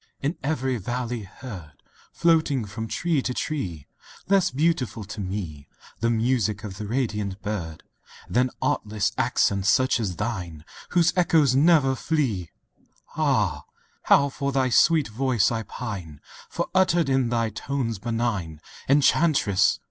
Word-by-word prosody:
V 140 - +2
In 170 - -6
every 130 -3 -1
valley 120 +2 -3
heard, 95 - -10 0.4
Floating 155 -7 +2
from 110 +3 -6
tree 160 +3 0
to 125 -1 -3
tree, 90 - -3 0.4
Less 195 -2 +4
beautiful 135 -6 0
to, 105 +1 -7
me, 90 -7 -5 0.3
The 115 - +1
music 115 -3 0
of 95 -3 -7
the 105 - -5
radiant 105 -5 -2
bird, 85 -7 -4 0.4
Than 125 +2 +2
artless 110 -8 0
accents 100 0 +1
such 130 +5 +3
as 100 -6 -2
thine 85 -7 -4 0.2
Whose 175 -1 +3
echoes 160 -6 +3
never 145 -2 +4
flee! 130 - -1 0.7
Ah! 105 - +1 0.4
how 140 0 +5
for 140 +1 -3
thy 130 -1 +1
sweet 160 +3 +4
voice 120 -1 +1
I 115 -1 -1
pine:— 95 -11 -7 0.3
For - - -2
uttered 175 -4 +3
in 130 -3 +2
thy 115 -2 0
tones 115 -1 -3
benign 115 -8 -2 0.3
(Enchantress!) 140 - +3
120 Hz, 135 wpm, -25 LUFS, 100-140 Hz, 0.7 s, how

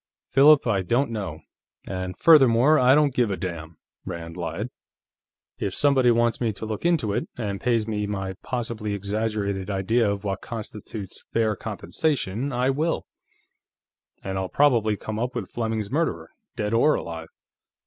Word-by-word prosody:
"Philip, 145 +2 +6
I 105 -5 +1
don't 120 +7 +1
know. 95 -8 -4 0.4
And 95 -1 -4
furthermore, 140 -1 +6
I 130 +2 +6
don't 150 -3 +3
give 120 -3 +2
a 95 - -2
damn," 85 -4 -6 0.3
Rand 85 -2 -6
lied. 90 +6 -4 0.9
"If 95 - -2
somebody 135 -4 +4
wants 120 0 +2
me 115 -2 +1
to 105 - -6
look 110 +9 -2
into 150 -12 +1
it, - - -2
and 100 -4 -3
pays 115 -3 +1
me 105 -2 -2
my 95 -2 -3
possibly 115 -4 -3
exaggerated 100 -1 -2
idea 105 +3 +1
of 100 0 -4
what 100 -1 -3
constitutes 105 -3 -7
fair 110 -2 +2
compensation, 135 -1 -2
I 125 +2 +1
will. 155 +5 -1 1.2
And 95 0 -3
I'll 95 -1 -3
probably 115 -7 +3
come 110 +1 -5
up 125 +2 -2
with 110 -6 -4
Fleming's 110 -2 -2
murderer, 90 - -1 0.2
dead 105 +1 -2
or 135 +7 +4
alive. 80 -1 -6
110 Hz, 155 wpm, -25 LUFS, 95-125 Hz, 1.2 s, Philip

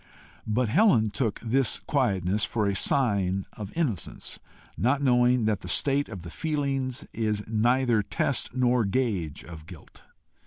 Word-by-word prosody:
But 115 +3 +1
Helen 120 - +3
took 110 0 -1
this 125 +2 +1
quietness 105 - 0
for 110 -1 0
a 100 -1 0
sign 100 -6 +1
of 105 -1 -8
innocence, 130 - -3 0.4
not 130 +5 +1
knowing 125 -2 +3
that 110 -2 +1
the 90 - -8
state 140 +9 +1
of 95 -6 -8
the 85 - -8
feelings 140 -5 -2
is 105 -2 -2
neither 120 +1 +2
test 125 +5 -1
nor 125 -1 +2
gauge 100 - -2
of 80 -2 -11
guilt. - - -13
115 Hz, 145 wpm, -26 LUFS, 100-130 Hz, 0.4 s, Helen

